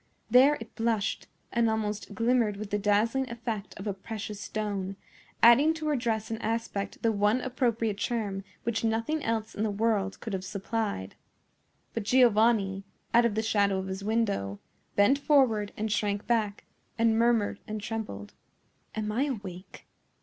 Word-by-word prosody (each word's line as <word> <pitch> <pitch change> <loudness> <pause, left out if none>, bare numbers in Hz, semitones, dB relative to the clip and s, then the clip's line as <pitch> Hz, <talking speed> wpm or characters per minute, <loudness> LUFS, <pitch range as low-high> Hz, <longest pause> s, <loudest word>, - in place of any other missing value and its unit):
There 265 +5 +7
it 225 -1 -10
blushed, 225 -2 -1 0.2
and 235 -1 +2
almost 210 -1 -2
glimmered 230 -2 +2
with 210 0 -6
the 205 - +1
dazzling 220 +6 +2
effect 230 -3 -5
of 195 - -7
a 205 - -1
precious 210 +1 -6
stone, 200 -3 -3 0.5
adding 275 +8 +7
to 320 -1 -5
her 300 - +2
dress 225 -4 -1
and 225 - -3
aspect 220 -3 -3
the 230 - +4
one 210 +3 +2
appropriate 235 -5 -1
charm 205 -3 -2 0.2
which 230 -1 -1
nothing 230 +8 0
else 225 -1 -1
in - - -4
the 220 - +1
world 205 -2 0
could 220 - -6
have 185 -1 -2
supplied. 200 - -3 0.8
But 230 - -2
Giovanni, 215 -4 +3 0.3
out 235 +1 +6
of 210 - -4
the 220 - 0
shadow 200 -3 +2
of 190 - -3
his 190 +1 -5
window, 200 - 0 0.4
bent 230 +8 +4
forward 250 -9 +3
and 220 0 -2
shrank 205 -1 0
back, 215 -4 0 0.3
and 225 -1 +3
murmured 230 -4 +2
and 215 0 -4
trembled. 210 - -5 0.6
"Am 215 -1 -2
I 250 +6 +1
awake? 195 -8 -7
220 Hz, 160 wpm, -28 LUFS, 205-230 Hz, 0.8 s, There